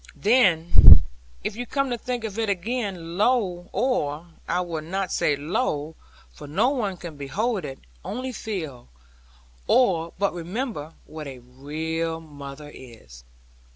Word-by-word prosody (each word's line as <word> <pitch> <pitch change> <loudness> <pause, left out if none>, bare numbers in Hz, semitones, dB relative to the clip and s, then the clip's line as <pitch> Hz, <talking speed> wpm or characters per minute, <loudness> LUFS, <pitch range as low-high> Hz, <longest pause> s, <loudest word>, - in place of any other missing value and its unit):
Then 190 -8 +7 0.4
(if - - -2
you 245 +1 -5
come 275 0 0
to - - +1
think 245 -1 -3
again) 200 -4 -2
lo! 205 -7 +2
or 175 - 0 0.2
I 180 - +1
will 170 -3 -3
not 185 +4 -2
say 145 - +2
lo! 150 - -1 0.4
for 145 - -10
no 200 - +2
one 210 -9 -1
can 170 -4 -8
behold 190 - -1
it 135 - -6 0.3
only 255 +3 -4
feel, 160 - -5 0.8
or 170 -10 +3
but 200 +1 +1
remember, 175 - -4
what 155 -1 -8
a 135 -2 -7
real 160 +6 -3
mother 145 -1 -10
is. 110 - -13
175 Hz, 130 wpm, -25 LUFS, 150-220 Hz, 0.8 s, Then